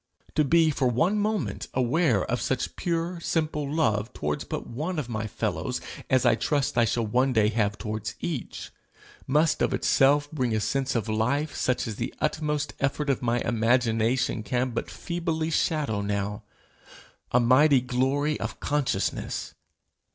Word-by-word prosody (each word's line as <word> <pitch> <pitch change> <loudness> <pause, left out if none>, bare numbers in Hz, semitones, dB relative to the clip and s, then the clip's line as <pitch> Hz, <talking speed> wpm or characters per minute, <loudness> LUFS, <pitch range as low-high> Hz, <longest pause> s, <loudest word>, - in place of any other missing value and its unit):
To 155 - +3
be 160 +2 +4
for 140 -3 +1
one 165 - +2
moment 205 - -1
aware 125 - +2
of 125 - -2
such 130 -2 -2
pure 170 0 -2
simple 155 -3 -1
love 110 -8 +1
towards 75 0 -2
but - - -5
one 155 +9 -4
of 140 -5 -3
my 110 -1 -3
fellows - - -2 0.3
as 130 -2 +3
I - - +6
trust 135 +5 0
I 120 -1 +4
shall 115 +1 0
one 125 +5 +2
day 105 -2 +4
have 105 -2 0
towards 110 +1 -4
each, 155 -8 -5 0.6
must 150 +4 +2
of - - +2
itself 145 +2 +3
bring 125 -7 0
a - - +1
sense 135 +5 -1
of 115 -4 0
life 125 +8 0
such 125 - 0
as 110 -3 -5
the 120 +2 -4
utmost 150 -1 -1
effort 140 +1 0
of 135 - -2
my 120 -1 +1
imagination 115 0 +1
can 125 +4 -1
but 115 - -3
feebly 165 -2 -2
shadow 150 -10 0
now 100 0 -2 0.9
a 125 - +4
mighty 130 +4 +5
glory 135 +4 0
of - - -5
consciousness! 145 -2 -1
130 Hz, 160 wpm, -26 LUFS, 115-150 Hz, 0.9 s, I